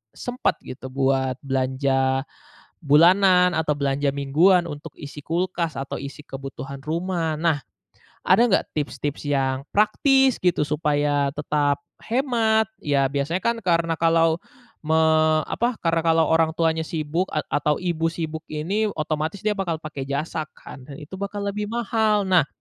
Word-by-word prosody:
sempat 245 0 -1
gitu 130 +1 -8
buat 130 0 0
belanja 135 0 0 0.6
bulanan 180 +4 +5
atau 155 -3 0
belanja 140 0 0
mingguan 165 +7 +4
untuk 150 -1 -8
isi 145 0 -9
kulkas 170 +1 -2
atau 135 0 -4
isi 140 +2 -8
kebutuhan 135 0 -8
rumah, 165 +1 -2
nah, 160 -2 +1 0.7
ada - - +5
nggak 195 - +2
tips-tips 145 -1 -3
yang 135 -2 0
praktis 265 +5 +3
gitu 180 -4 +2
supaya 145 -1 +1
tetap 145 +1 0 0.2
hemat? 230 -3 +1 0.2
Ya, 140 -2 +2
biasanya 150 +6 -1
kan 235 0 +1
karena 170 -2 +1
kalau 165 0 +3 0.4
me 160 0 0 0.6
apa, 240 +1 0
karena 165 -1 +2
kalau 165 0 +3
orang 160 0 +2
tuanya 160 -1 +1
sibuk 165 +3 -2
a 155 - 0
atau 150 +1 +2
ibu 170 -3 -1
sibuk 160 -1 -5
ini, 190 +9 -1
otomatis 155 +4 -2
dia 215 - +3
bakal 190 -5 -2
pakai 145 -3 -6
jasa 155 +2 -3
kan, - - -11
dan 140 - -9
itu 150 +4 -12
bakal 200 +1 -4
lebih 205 +1 -3
mahal. 220 -2 +1
Nah, 180 -6 +3
160 Hz, 145 wpm, -23 LUFS, 145-185 Hz, 0.7 s, bulanan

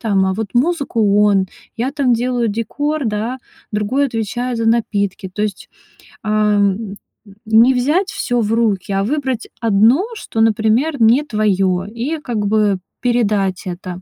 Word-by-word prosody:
там, 200 -5 +1
а 190 - +1
вот 210 -1 -5
музыку- 240 -8 +2
он, 195 -2 +3 0.3
я 240 +3 -1
там 275 -4 +1
делаю 240 0 0
декор, 285 +8 -2
да, 225 +3 -2 0.3
другой 215 +7 +1
отвечает 240 +1 -3
за 230 - -1
напитки. 205 -4 0
То 190 +3 -4
есть, 210 -3 -4 0.5
ам, 210 -2 +2
м, 200 0 -6 0.3
м, 200 - -16
не 225 +4 +5
взять 300 +10 +1
всё 245 -1 -1
в 215 -1 -1
руки, 215 -4 0
а 195 0 0
выбрать 260 -2 -2
одно, 225 - +4
что, 225 - -3
например, 225 +6 +2
не 235 +6 +5
твоё, 195 -7 0
и 235 +10 -4
как 230 -7 -3
бы 210 -2 +2 0.2
передать 210 -6 0
это. 180 0 -6
220 Hz, 155 wpm, -18 LUFS, 205-245 Hz, 0.5 s, не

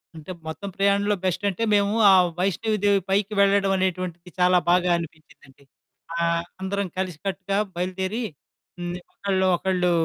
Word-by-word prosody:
అంటే 160 +3 -9 0.2
మొత్తం 195 +5 -5
ప్రయాణంలో 200 +1 +2
బెస్టంటే 195 +3 -1
మేము 200 0 +3 0.2
ఆ - - +8 0.3
వైష్ణవి 210 +4 0
దేవి 200 -1 +4
పైకి 200 +2 +1
వెళ్లడమనేటువంటిది 190 -3 +1
చాలా 180 0 +5
బాగా 180 0 +3
అనిపించిందండి. 155 -4 -11 0.5
ఆహ్, 170 0 +1 0.2
అందరం 200 +1 -2
కలిసికట్టుగా 190 +2 -3 0.2
బయలుదేరి 185 +5 -2 0.6
హ్మ్, 175 0 -4 0.2
ఒకళ్ళు 190 -1 0
ఒకళ్ళు 180 -1 +1
190 Hz, 120 wpm, -24 LUFS, 175-200 Hz, 0.6 s, ఆ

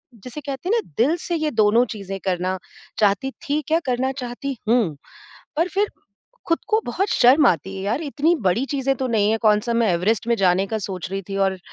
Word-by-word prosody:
जिसे 250 +7 -9
कहते 280 +5 -5
हैं 445 - +3
ना - - -23
दिल 310 +6 +2
से 345 - 0
ये 310 -1 -1
दोनों 225 +1 +4
चीज़ें 195 -3 -6
करना 185 0 0 0.4
चाहती 215 +6 +2 0.2
थी 300 +1 +1
क्या 325 +1 +3
करना 255 +1 0
चाहती 250 +2 -5
हूँ। 225 -10 +2 0.6
पर 335 +3 +2
फ़िर 405 +3 0 0.6
ख़ुद 330 - +3
को 435 +1 +3
बहुत 380 +12 -1
शर्म 270 +4 +5
आती 190 +3 +1
है 190 - -5
यार, 215 +8 -1
इतनी 310 +3 +1
बड़ी 190 +7 +2
चीज़ें 270 -1 0
तो 260 +1 -2
नहीं 215 -3 +2
है, 225 - +2
कौन-सा 215 +2 +2
मैं 230 -1 +2
एवरेस्ट 200 +6 0
में 235 - +4
जाने 190 0 +2
का 220 +2 -2
सोच 190 -3 -5
रही 195 0 -3
थी 195 - -4
और 195 -1 +1
235 Hz, 210 wpm, -22 LUFS, 195-280 Hz, 0.6 s, शर्म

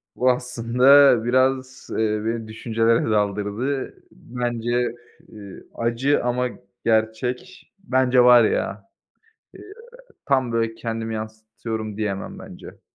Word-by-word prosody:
Bu 130 - +2
aslında 125 +1 +4
biraz, 130 +1 0
eee, - - -3 0.3
beni 115 0 -3
düşüncelere 115 +1 0
daldırdı. 105 +6 -2 0.2
Bence, 120 0 -2 0.4
eee, 100 -3 -12
acı 120 +5 0
ama 125 +1 0 0.4
gerçek, 115 +9 -2
bence 130 -7 +2
var 125 -1 +7
ya, 100 -2 -2 0.7
eee, - - -13 0.7
tam, 130 -4 +1
böyle, 115 -1 -1
kendimi 115 -1 -4
yansıtıyorum 110 0 -6
diyemem, 105 -3 -4
bence. - - -12
115 Hz, 100 wpm, -22 LUFS, 110-125 Hz, 0.7 s, var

